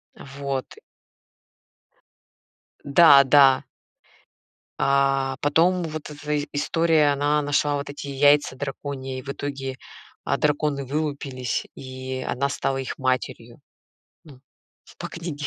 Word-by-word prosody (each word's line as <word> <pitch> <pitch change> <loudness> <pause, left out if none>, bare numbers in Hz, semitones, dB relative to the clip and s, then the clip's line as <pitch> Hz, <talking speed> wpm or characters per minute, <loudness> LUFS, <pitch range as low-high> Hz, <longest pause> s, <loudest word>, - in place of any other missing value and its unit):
Вот. 140 -1 -6 2.1
Да-да. 140 -3 +6 1.2
А, 135 -1 +2
потом 175 +5 +2
вот 155 -2 -6
эта 150 0 -7
и 150 -1 -1
история, 155 0 +2
она 145 +1 +1
нашла 145 0 +1
вот 140 0 -4
эти 145 0 -8
яйца 145 0 +3
драконьи, 135 -1 -5
и - - -8
в 135 - -17
итоге, 140 -1 -5 0.5
а, - - 0
драконы 150 -2 0
вылупились, 140 -3 -3
и 130 0 -6
она 135 +3 -1
стала 135 -1 -2
их 135 0 -5
матерью. 130 -2 -3 0.7
Ну, 140 -5 -15 0.4
в - - -19
по - - -6
книге. 160 -4 -6
140 Hz, 115 wpm, -24 LUFS, 135-150 Hz, 2.1 s, Да-да